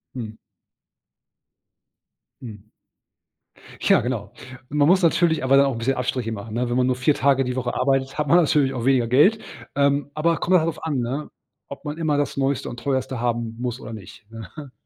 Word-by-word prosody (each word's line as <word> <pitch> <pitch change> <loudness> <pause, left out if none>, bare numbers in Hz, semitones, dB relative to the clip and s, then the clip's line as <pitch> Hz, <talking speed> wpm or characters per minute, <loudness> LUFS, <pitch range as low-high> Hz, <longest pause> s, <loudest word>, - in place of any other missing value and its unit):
Mhm. 110 -3 -7 2.0
Hm. 105 -4 -10 1.2
Ja, - - +4
genau. 120 -3 -4 0.4
Man 145 0 +2
muss 185 +2 +4
natürlich 165 -3 +2
aber 135 +1 +5
auch 135 - -1
'n - - -6
bisschen 130 +4 0
Abstriche 125 -2 -2
machen, 105 0 -7
ne? 120 0 -1
Wenn 120 - 0
man 130 0 +2
nur 130 - +1
4 125 +4 +2
Tage 135 -1 +2
die 125 0 -3
Woche 125 -1 -2
arbeitet, 135 +1 0
hat 150 -1 -1
man 170 +5 +5
natürlich 145 -5 +2
auch 120 -1 -4
weniger 130 -4 +3
Geld. 150 - +4 0.4
Ähm, 140 0 +1
aber 165 +2 +1
kommt 185 - -1
dann 175 - +5
halt 160 - -1
drauf 160 -1 -5
an, 145 -5 -1
ne, 130 +5 -3 0.4
ob 140 - -10
man 150 +2 -5
immer 155 -3 0
das 145 -1 -2
neueste 135 0 -1
und 120 - -8
teuerste 130 -1 -2
haben 115 -1 -2
muss 125 0 -3
oder 115 - -9
nicht, 110 +1 -12
ne? 115 +6 -10
130 Hz, 195 wpm, -22 LUFS, 120-145 Hz, 2.0 s, aber